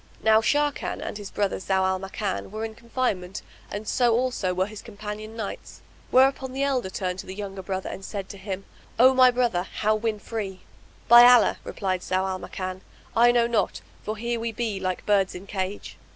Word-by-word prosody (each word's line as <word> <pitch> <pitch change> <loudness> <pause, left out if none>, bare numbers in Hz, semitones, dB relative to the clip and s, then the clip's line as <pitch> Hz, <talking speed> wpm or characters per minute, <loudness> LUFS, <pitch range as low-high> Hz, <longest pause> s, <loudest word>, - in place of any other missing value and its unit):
Now 220 0 +5
Sharrkan 290 +5 0
and - - -5
his 200 -2 -7
brother, 200 -2 -1
Zau 190 0 +1
al 190 0 +1
Makan, 195 0 -4
were 215 +2 -4
in 220 - -6
confinement 220 -6 -3 0.3
and 210 +1 -6
so 240 -3 +3
also 245 -6 0
were 185 +1 +1
his 210 +1 -9
companion 215 0 -7
knights; 220 -3 -7 0.3
whereupon 265 0 +3
the 270 +1 -1
elder 260 -8 0
turned 185 -1 -3
to - - -7
the 190 - -7
younger 195 -1 -6
brother 190 0 -4
and 195 - -6
said 195 -1 -5
to 200 - -9
him, 195 0 -5 0.3
"O 255 +3 +7
my 255 -1 +7
brother, 245 -7 +1
how 210 +3 0
win 215 0 -1
free?" 205 -3 -5 0.5
"By 240 0 +10
Allah," 245 -3 +5
replied 185 -3 -2
Zau 185 +1 0
al 190 -1 -3
Makan, 185 0 -5 0.3
"I 240 +1 +6
know 240 -1 +3
not; 235 -2 0 0.2
for 215 +1 -4
here 235 +1 -2
we 230 0 -2
be 220 -3 -2
like 185 -1 -3
birds 200 -2 +2
in 180 +2 -8
cage." 195 0 -5
210 Hz, 195 wpm, -25 LUFS, 190-235 Hz, 0.5 s, By